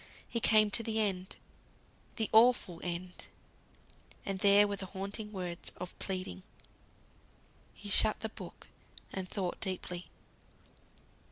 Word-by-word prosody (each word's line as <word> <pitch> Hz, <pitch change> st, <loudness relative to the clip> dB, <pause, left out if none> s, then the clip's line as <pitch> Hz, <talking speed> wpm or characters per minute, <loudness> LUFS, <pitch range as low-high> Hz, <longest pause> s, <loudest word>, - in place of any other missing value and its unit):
He 235 Hz, -, -2 dB
came 215 Hz, -2 st, +4 dB
to 230 Hz, -, +4 dB
the 220 Hz, -1 st, -2 dB
end; 190 Hz, -3 st, -2 dB, 0.8 s
the 220 Hz, -, -1 dB
awful 220 Hz, -7 st, +4 dB
End. 180 Hz, +1 st, -5 dB, 1.0 s
And 195 Hz, -1 st, -3 dB
there 200 Hz, +1 st, +6 dB
were 200 Hz, 0 st, -3 dB
the 190 Hz, -1 st, -6 dB
haunting 200 Hz, +3 st, -4 dB
words 180 Hz, -3 st, -5 dB
of 180 Hz, -, -7 dB
pleading. 185 Hz, -, -4 dB, 1.3 s
He -, -, -10 dB
shut -, -, +7 dB
the -, -, -3 dB
book, -, -, -11 dB, 0.5 s
and 190 Hz, -1 st, -5 dB
thought 185 Hz, -4 st, -3 dB
deeply. 180 Hz, -2 st, -3 dB
195 Hz, 120 wpm, -32 LUFS, 180-210 Hz, 1.3 s, shut